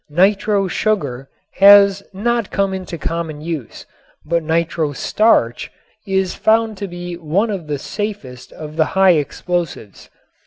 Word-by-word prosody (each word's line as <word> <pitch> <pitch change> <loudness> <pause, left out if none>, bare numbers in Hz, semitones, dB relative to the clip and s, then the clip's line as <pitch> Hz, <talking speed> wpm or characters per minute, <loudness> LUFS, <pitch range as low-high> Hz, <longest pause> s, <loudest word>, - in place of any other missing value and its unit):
Nitro 195 +4 +2
sugar 145 - -2 0.3
has 200 0 +7
not 230 +2 -1
come 195 -1 0
into 185 -2 -6
common 165 -2 -4
use, 155 -6 -6 0.4
but 170 +2 0
nitro 160 -1 -1
starch 135 - +1 0.4
is 190 -1 0
found 220 0 +1
to 200 +1 -5
be 175 0 -7
one 175 +7 0
of 175 -7 -6
safest 150 - -6
of 155 0 -9
the 160 - +3
high 190 -1 +6
explosives. 165 - -4
175 Hz, 125 wpm, -18 LUFS, 155-200 Hz, 0.4 s, has